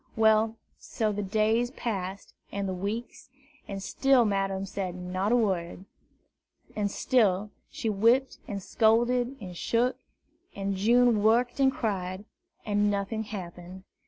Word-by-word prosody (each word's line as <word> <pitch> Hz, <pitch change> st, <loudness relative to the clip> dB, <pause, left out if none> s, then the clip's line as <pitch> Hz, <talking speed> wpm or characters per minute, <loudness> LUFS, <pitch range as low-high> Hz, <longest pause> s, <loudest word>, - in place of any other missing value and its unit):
Well, 220 Hz, 0 st, +3 dB, 0.2 s
so 215 Hz, -2 st, -2 dB
the 205 Hz, 0 st, -3 dB
days 220 Hz, +4 st, +1 dB
passed, 200 Hz, -6 st, -5 dB, 0.2 s
and 200 Hz, -1 st, -2 dB
the 190 Hz, -, -2 dB
weeks, 205 Hz, +9 st, -5 dB, 0.4 s
and 195 Hz, -1 st, -5 dB
still 270 Hz, 0 st, +3 dB
Madame 195 Hz, -1 st, -1 dB
said 190 Hz, -2 st, -4 dB
not 185 Hz, +3 st, -2 dB
a -, -, +5 dB
word; 190 Hz, -5 st, -1 dB, 0.9 s
and 205 Hz, -1 st, 0 dB
still 210 Hz, -4 st, +1 dB, 0.2 s
she -, -, -5 dB
whipped 230 Hz, +6 st, +2 dB
and 200 Hz, -2 st, -5 dB
scolded 240 Hz, +4 st, +2 dB
and 185 Hz, -4 st, -8 dB
shook, 240 Hz, +7 st, 0 dB, 0.6 s
and 195 Hz, 0 st, -2 dB
June 235 Hz, +2 st, +4 dB
worked 235 Hz, +5 st, +2 dB
and 265 Hz, -1 st, +5 dB
cried, 195 Hz, -5 st, -3 dB, 0.4 s
and 205 Hz, -1 st, +2 dB
nothing 205 Hz, +2 st, -2 dB
happened. 185 Hz, -2 st, -8 dB
210 Hz, 130 wpm, -28 LUFS, 195-230 Hz, 0.9 s, a